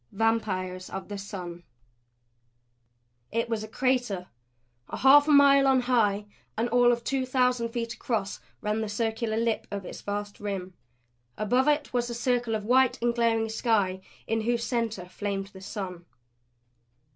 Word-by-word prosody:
VAMPIRES 190 -4 -1
OF 190 +1 -6
THE 205 - -5
SUN 180 -3 -7 1.7
It 230 +1 0
was 225 -2 -1
a - - -6
crater; 245 -6 -1 0.6
a - - -5
half 285 +2 +7
mile 280 -2 +6
on 265 -1 +4
high 215 -5 +2 0.3
and 230 +2 +1
all 245 +1 +5
of 235 0 -1
two 270 +1 0
thousand 250 -2 +1
feet 230 0 -3
across 220 -5 -3 0.2
ran 210 +1 -1
the 220 - -3
circular 220 +1 -1
lip 230 -1 0
of 200 -2 -5
its - - -8
vast 205 0 -4
rim. 195 -3 -4 0.6
Above 245 +6 +2
it 295 -2 +1
was 245 -1 0
a 235 - -4
circle 240 -1 0
of 210 -1 -4
white 255 +2 +3
and 235 0 +1
glaring 230 -1 +1
sky 210 -5 0 0.2
in 225 0 0
whose 235 +1 0
center 230 -6 -2
flamed 195 +1 -4
the 190 - -11
sun. 190 -3 -6
225 Hz, 155 wpm, -27 LUFS, 205-245 Hz, 1.7 s, half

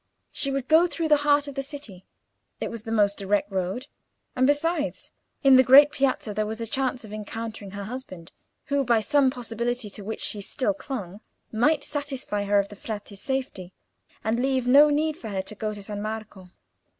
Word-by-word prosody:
She 275 - 0
would 270 -1 -2
go 325 +3 +6
through 330 -2 -2
the 300 - +6
heart 290 0 +2
of 285 - -6
the 275 - -2
city; 270 -10 -9 0.5
it - - -3
was 230 -2 -5
the 225 - -7
most 205 -2 +2
direct 200 +1 0
road, 190 +7 -2 0.5
and, 255 0 +3
besides, 295 +1 0 0.3
in 270 -2 +8
the - - +8
great 275 +3 +8
Piazza 270 -6 0
there 215 +1 -1
was 220 +1 -5
a 230 - -3
chance 255 0 -2
of 210 - -10
encountering 215 0 -6
her 200 +1 -6
husband, 195 -7 -8 0.3
who, 280 0 +1
by 235 -3 +3
some 280 +3 +3
possibility 240 -2 -3
to 205 - -8
which 220 +3 -5
she 205 - -3
still 265 +8 -1
clung, 220 - -7 0.3
might 285 +7 +2
satisfy 270 -8 -3
her 205 0 +3
of 200 0 +1
the 205 - -10
Frate's 205 -1 -7
safety, 255 -9 -4 0.5
and 220 +2 0
leave 260 -1 0
no 285 +4 +7
need 305 +1 0
for 225 - -7
her 190 -2 -2
to - - -5
go 215 0 -3
to 205 -1 -7
San 205 0 -5
Marco. 215 -3 -6
235 Hz, 200 wpm, -25 LUFS, 205-275 Hz, 0.5 s, in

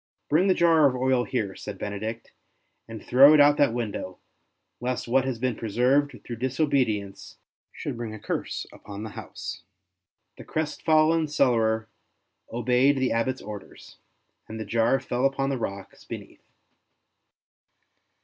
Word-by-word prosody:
'' - - -54
Bring 170 +6 +4
the 185 - +4
jar 165 -3 +5
of 130 - -1
oil 130 -1 +1
here/' 105 -7 -2
said - - -7
Benedict, 110 +3 -5 0.3
*' - - -48
and 115 -2 -9
throw 140 +5 +7
it - - +5
out 145 0 +8
of 145 - -6
that 145 - +4
window, 105 -6 -4 0.6
lest 125 0 -3
what 130 +2 +2
has 130 -3 -2
been 125 0 -1
preserved 125 +7 +1
through 120 - -6
disobedience 125 -6 -1 0.3
should - - -6
bring 115 -2 -5
a 110 - -7
curse - - -4
upon 100 +1 -9
the 110 - -6
house.'' - - -7 0.8
The - - -8
crestfallen 155 +1 +1
cellarer 115 -6 +1 0.6
obeyed 125 +4 +2
the 130 -1 +1
Abbot's 125 +3 -1
orders, 105 -2 -10 0.5
and 110 +1 -7
the 110 - -4
jar 115 +3 +2
fell 125 0 -3
upon 135 0 +1
the 135 - -2
rocks 100 -3 -6
be - - -6
neath. - - -17
125 Hz, 155 wpm, -26 LUFS, 110-140 Hz, 0.8 s, out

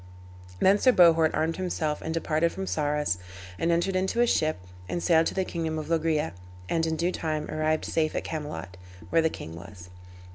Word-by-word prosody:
Then 195 +2 +5
Sir 255 - +5
Bohort 165 -4 +6
armed 160 +1 0
himself 165 -5 -2
and 160 - -4
departed 165 0 +1
from 190 - -5
Sarras, 150 - 0 0.4
and 170 - +1
entered 175 +3 +1
into 190 +5 0
a 240 - +6
ship, 155 -9 +1 0.3
and 175 - -2
sailed 165 -2 +4
to - - -4
the 190 -1 0
kingdom 160 -3 -3
of 155 0 -5
Loegria, 160 -2 +1 0.3
and 165 - 0
in 160 - 0
due 170 +3 0
time 155 -3 -3
arrived 155 0 0
safe 155 -1 0
at - - -1
Camelot, 150 - -6 0.3
where 165 - +4
the 160 - +2
king 80 - -8
was. 90 +1 -11
160 Hz, 190 wpm, -27 LUFS, 155-170 Hz, 0.4 s, Bohort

